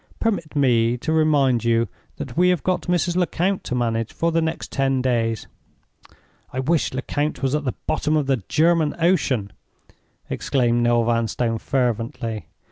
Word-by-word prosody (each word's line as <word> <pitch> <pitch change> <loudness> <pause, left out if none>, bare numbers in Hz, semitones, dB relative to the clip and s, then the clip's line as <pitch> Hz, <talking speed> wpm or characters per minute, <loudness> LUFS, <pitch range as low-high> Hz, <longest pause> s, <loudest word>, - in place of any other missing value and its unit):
Permit 195 -9 -1
me 120 -4 +3
to 160 +6 -2
remind 145 -7 +3
you 115 0 +2 0.3
that 135 -4 -7
we 180 +2 +4
have 180 -5 +1
got 185 -1 -1
Mrs. 175 0 +1
Lecount 180 +1 0
to 125 - -2
manage 115 -2 -1
for 170 0 0
the 165 0 +2
next 160 0 -3
ten 135 -1 +1
days." 115 -4 0 1.1
"I 130 - -4
wish 155 +4 +1
Lecount 140 +2 -2
was 135 0 +1
at 150 -1 -1
the 125 - -2
bottom 155 +1 +1
of 150 - +1
the 135 -1 +2
German 160 -1 +3
Ocean!" 140 - +1 0.7
exclaimed 120 -3 +1
Noel 120 0 +3
Vanstone, 115 0 0
fervently. 115 -4 -2
135 Hz, 155 wpm, -22 LUFS, 120-160 Hz, 1.1 s, we